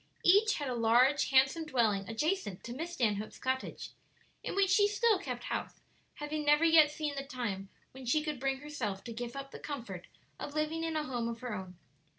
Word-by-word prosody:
Each 405 +4 +5
had 290 - -3
a 255 - -1
large, 240 +5 +4
handsome 270 +4 +4
dwelling 220 -8 +1
adjacent 265 - -1
to 235 - -6
Miss 330 +6 -5
Stanhope's 215 -8 -1
cottage, 260 0 -3 0.5
in - - -4
which 390 -1 +3
she 410 +1 +5
still 420 0 +2
kept 395 - -5
house, - - -4 0.4
having 300 0 -3
never 295 +2 +4
yet 320 -2 +7
seen 300 -1 -3
the 275 -1 -4
time 235 -8 -4 0.2
when 260 -1 -10
she 305 +5 +2
could 300 -4 -3
bring 270 +1 -1
herself 235 -10 -4
to 235 - -6
give 240 +2 -5
up 275 0 -6
the - - -9
comfort 230 - -6 0.3
of 290 - -6
living 310 +2 -1
in 325 -1 -2
a 305 - 0
home 245 -5 -2
of 230 0 -5
her 250 -3 -4
own. 185 -3 -7
275 Hz, 200 wpm, -32 LUFS, 235-310 Hz, 0.5 s, yet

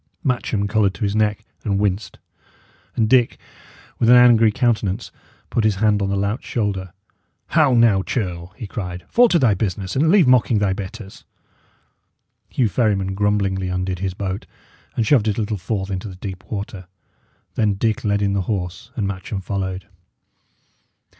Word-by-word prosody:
Matcham 120 -7 0
coloured 100 -2 +1
to - - -5
his 100 0 0
neck 110 0 0 0.2
and 100 -3 0
winced; 100 -1 -1 0.8
and 110 - +2
Dick, 120 0 +3 0.6
with 115 - +3
an 125 - +9
angry 120 -3 +6
countenance, 110 -2 0 0.4
put 115 - +1
his 110 -2 +2
hand 105 +1 +2
on 100 - 0
the 100 - 0
lout's 100 +4 -1
shoulder. 100 -5 -2 0.6
"How 150 -6 +4
now, 115 -5 +4
churl!" 90 -5 -3
he - - -6
cried. 90 -4 -6
"Fall 245 +1 +5
to 175 - +4
thy 125 -9 +4
business, 95 -1 -3
and 150 +4 +3
leave 190 -2 +6
mocking 125 -3 +4
thy 100 -2 +1
betters." 100 +1 -8 1.3
Hugh 125 - +1
Ferryman 100 -3 0
grumblingly 100 -2 0
undid 90 0 -2
his 95 -1 -3
boat, 95 0 -4 0.5
and 115 - +1
shoved 115 -4 +3
it 105 - 0
a - - 0
little 105 0 -2
forth 95 +1 -3
into 95 +2 -4
the 95 - -8
deep 95 0 -7
water. 100 -3 -5 0.7
Then 105 -3 +1
Dick 110 +1 -1
led 100 -1 +1
in 100 -1 +1
the 100 - +1
horse, 95 +2 -3
and 105 -5 -1
Matcham 95 +1 -4
followed. 95 0 -3
100 Hz, 165 wpm, -21 LUFS, 95-115 Hz, 1.3 s, an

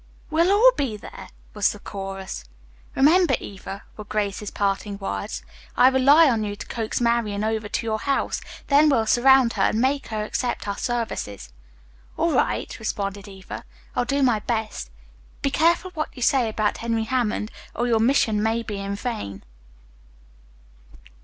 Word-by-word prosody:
"We'll 335 +3 +3
all 450 +5 +7
be 240 - -2
there!" 190 -2 -11 0.2
was 210 -1 +2
the - - -8
chorus. 195 - -6 0.5
"Remember, 335 +6 +5
Eva," 195 0 -8
were 210 - -7
Grace's 210 -1 -2
parting 200 0 -1
words, 195 - -4 0.3
"I 250 +1 +7
rely 280 +5 +6
on 230 -5 +1
you 205 -1 -3
to - - -8
coax 225 -2 -3
Marian 235 -4 +1
over 220 -1 -1
to 230 - -2
your 220 -1 -1
house, 275 +2 -1 0.2
then 295 +2 +5
we'll 230 -6 +3
surround 250 +1 +5
her 200 - -2
and 215 - +2
make 270 +3 +1
her 215 -1 -3
accept 240 +1 -2
our 200 - -3
services." 105 - -3 0.6
"All 335 +1 +2
right," - - 0
responded 200 -2 -3
Eva. 190 -1 -9 0.3
"I'll 245 - +1
do 275 +3 +1
my 240 -4 +3
best. 220 - -3 0.5
Be 275 - +1
careful 340 +5 +2
what 310 -4 -3
you 250 - -4
say 250 -2 +3
about 215 -1 0
Henry 230 -1 -1
Hammond, 220 -2 -1 0.2
or 240 - 0
your 230 -2 +2
mission 225 -3 +3
may 225 +2 0
be 210 -3 -5
in 200 0 -3
vain." 100 - -5
225 Hz, 160 wpm, -24 LUFS, 205-260 Hz, 0.6 s, all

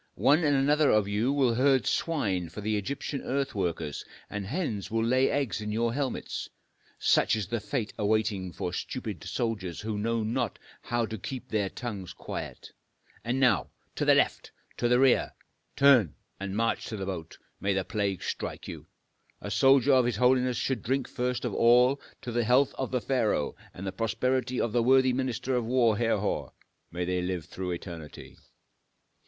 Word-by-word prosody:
One 150 +5 +4
and 145 -2 +3
another 145 +2 +3
of 105 -2 +3
you 105 +6 +1
will 135 -4 +2
herd 130 -1 +3
swine 100 - 0
for 100 +5 -8
Egyptian 110 +6 -2
earth 135 +1 -2
workers, 85 -6 -2 0.3
and 100 -2 -4
hens 130 - -3
will 115 0 0
lay 130 +3 +3
eggs 140 -6 -1
in 105 0 -4
your 115 +2 0
helmets. 140 0 -3 0.5
Such - - +3
is 110 -2 -2
the 115 +5 -2
fate 120 -1 -3
waiting 105 -3 0
for 90 +1 -4
stupid 105 - -5
soldiers 105 -8 -3
who 105 -1 -3
know 115 +1 0
not 120 0 -1 0.2
how 120 -1 -1
to 110 -1 -6
keep 130 +5 -6
their 105 -3 0
tongues 100 -7 -6
quiet. - - -7 0.5
And 125 +3 -1
now 130 -2 +3 0.2
to - - -2
the - - +5
left! - - +1 0.3
to 120 - +1
the 125 +1 +4
rear! 130 -1 +3 0.4
turn! 130 - +5 0.2
and 100 +1 -4
march 115 0 0
to 110 - -5
the 95 - -4
boat, 85 -4 -6 0.2
may 100 0 0
the 95 -1 -1
plague 100 -4 -2
strike - - -4
you! - - -8 0.5
A 100 - -6
soldier 135 +4 +5
of 130 -2 +5
his 120 -2 0
holiness 125 +1 +3
should 130 -2 -1
drink 130 +2 -1
first 125 0 -2
of - - -2
all 125 +4 +4 0.2
to 125 - -4
the 120 0 +1
health 125 +4 +3
of 130 - -3
the 125 -1 -1
pharaoh 115 - 0 0.2
and 95 - -8
the 95 - -2
prosperity 125 +4 -1
of 115 - 0
the 120 +1 +2
worthy 130 +1 +4
minister 130 0 -2
of 125 - +1
war, 120 -2 +3
Herhor, 115 0 -1 0.4
may 90 +1 -2
they 90 0 0
live 90 -2 -3
through 95 -1 -5
eternity!" 85 -3 -7
115 Hz, 180 wpm, -28 LUFS, 100-130 Hz, 0.5 s, the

